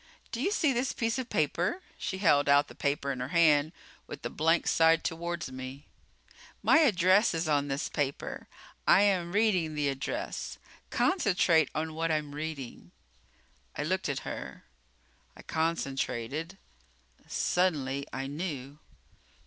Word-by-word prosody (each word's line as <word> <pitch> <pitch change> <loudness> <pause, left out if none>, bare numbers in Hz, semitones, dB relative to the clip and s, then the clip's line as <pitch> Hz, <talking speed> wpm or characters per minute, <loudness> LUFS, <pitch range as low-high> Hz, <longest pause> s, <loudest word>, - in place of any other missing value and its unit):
Do 235 - -3
you 375 - +2
see 320 -9 +2
this 250 +1 -1
piece 230 +2 -1
of 250 -2 -5
paper?" 170 - 0 0.2
She 190 - -4
held 145 -7 +3
out 145 0 +5
the - - -10
paper 140 -1 -1
in 130 - -4
her 125 - -3
hand 155 -2 +4 0.4
with - - -9
the - - -3
blank 165 +2 +2
side 165 0 +4
toward 170 +1 -3
me. 130 +2 -8 0.8
"My 320 - +6
address 195 - +4
is 165 0 -1
on 145 -2 +1
this 140 +1 -2
paper. 140 -2 -3 0.4
I 200 - +7
am 185 -4 +1
reading 190 -7 +2
the 145 -1 +1
address. 135 0 -4 0.3
Concentrate 180 - +3
on 160 +1 -2
what 165 +1 -1
I'm 150 -2 -1
reading." 145 - -6 0.9
I - - -1
looked 185 +1 -1
at 140 - -2
her. - - -7 0.7
I - - -12
concentrated. 160 0 -2 0.7
Suddenly, 140 -6 0
I 135 0 -4
knew. 145 -2 -5
160 Hz, 140 wpm, -29 LUFS, 145-185 Hz, 0.9 s, I